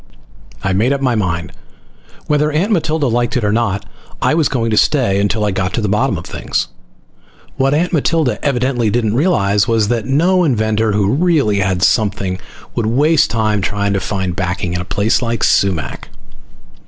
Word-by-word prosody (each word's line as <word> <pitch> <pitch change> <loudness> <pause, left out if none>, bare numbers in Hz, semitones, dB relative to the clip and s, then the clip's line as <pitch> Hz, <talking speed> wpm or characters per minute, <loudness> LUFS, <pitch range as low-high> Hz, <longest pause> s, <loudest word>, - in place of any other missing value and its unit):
I 95 - 0
made 115 +8 +2
up 140 - -3
my 130 -3 +1
mind. 90 -5 -2 0.7
Whether 150 0 +1
Aunt 175 +9 0
Matilda 160 -5 0
liked 120 +1 0
it 120 - -2
or 105 - +1
not, 105 -3 -1 0.3
I - - +1
was 155 -3 +2
going 115 -3 -1
to - - +2
stay 120 -8 +2
until 105 +1 0
I 105 - 0
got 95 -1 -2
to - - 0
the 105 - -1
bottom 105 +2 +1
of - - -8
things. - - -3 0.9
What 135 +2 +2
Aunt 175 +4 0
Matilda 155 -2 0
evidently 125 -4 0
didn't 110 -1 0
realize 105 - +2
was 110 -2 +1
that 115 -3 -1
no 175 +7 +2
inventor 110 -6 +1
who 100 0 +1
really 145 - +2
had 95 -2 0
something 100 -4 +1 0.3
would 115 - -1
waste 145 +4 +3
time 110 -2 0
trying 100 +1 -1
to 100 - 0
find 95 -3 -3
backing 90 -1 -2
in 90 - -2
a - - -6
place 100 +3 0
like 115 -2 -2
Sumac. 95 -6 0
110 Hz, 180 wpm, -16 LUFS, 100-140 Hz, 0.9 s, waste